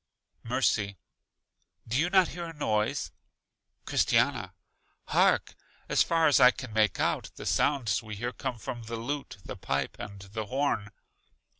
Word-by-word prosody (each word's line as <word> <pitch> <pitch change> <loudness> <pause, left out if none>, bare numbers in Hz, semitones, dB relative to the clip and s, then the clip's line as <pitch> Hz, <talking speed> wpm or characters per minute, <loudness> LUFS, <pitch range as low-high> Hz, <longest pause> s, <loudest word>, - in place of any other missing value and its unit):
Mercy: 110 -5 0 0.9
Do 115 - -2
you 165 +6 +2
not 190 -2 +5
hear 175 +1 -5
a 165 - -7
noise? 110 -8 -1 0.7
Christiana: - - +1 0.5
Hark! - - +3 0.3
as - - +3
far 165 -1 +3
as 145 - +5
I 125 - +9
can 125 -3 -6
make 110 -3 +2
out, - - 0
the - - -8
sounds 120 -7 +1
we 110 -2 -7
hear 120 +4 -3
come 125 0 -4
from 115 +1 -6
the 115 +1 -4
lute, 135 +2 -4
the - - -6
pipe, 70 0 -2
and 100 -1 -8
the 105 +2 -6
horn. 125 -5 0
120 Hz, 150 wpm, -29 LUFS, 105-140 Hz, 0.9 s, I